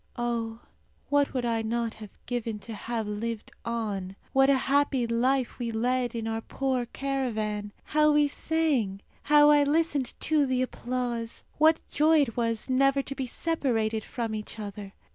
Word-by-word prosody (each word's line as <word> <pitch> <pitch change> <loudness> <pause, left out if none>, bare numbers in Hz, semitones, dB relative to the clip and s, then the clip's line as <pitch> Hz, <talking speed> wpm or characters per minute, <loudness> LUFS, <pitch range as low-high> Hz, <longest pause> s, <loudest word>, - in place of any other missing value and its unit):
Oh, 230 -1 -2 0.5
what 285 -1 +3
would 250 -2 -2
I 230 -1 +1
not 230 0 -1
have 215 -2 -10 0.2
given 235 -3 -3
to 230 - -7
have 225 +1 -3
lived 215 +2 -4
on! 210 -5 -3 0.2
What 270 0 +5
a 275 - +5
happy 275 -2 +2
life 250 +3 +1
we 240 -1 -2
led 245 +2 0
in 225 -1 -3
our 225 0 -2
poor 260 -1 -1
caravan! 220 -7 -2
How 305 +1 +3
we 295 0 +4
sang! 280 -11 0 0.2
How 295 0 +6
I 295 -1 +6
listened 290 -3 +1
to 305 -3 +2
the 255 0 +1
applause! 245 -2 -3 0.2
What 315 +1 +4
joy 310 +1 +4
it 230 -6 -1
was 230 -2 -1
never 275 +1 +3
to 275 - -5
be 270 -2 -4
separated 230 -9 -1
from 230 -2 -4
each 215 0 -6
other! 205 -2 -7
240 Hz, 160 wpm, -28 LUFS, 225-275 Hz, 0.5 s, How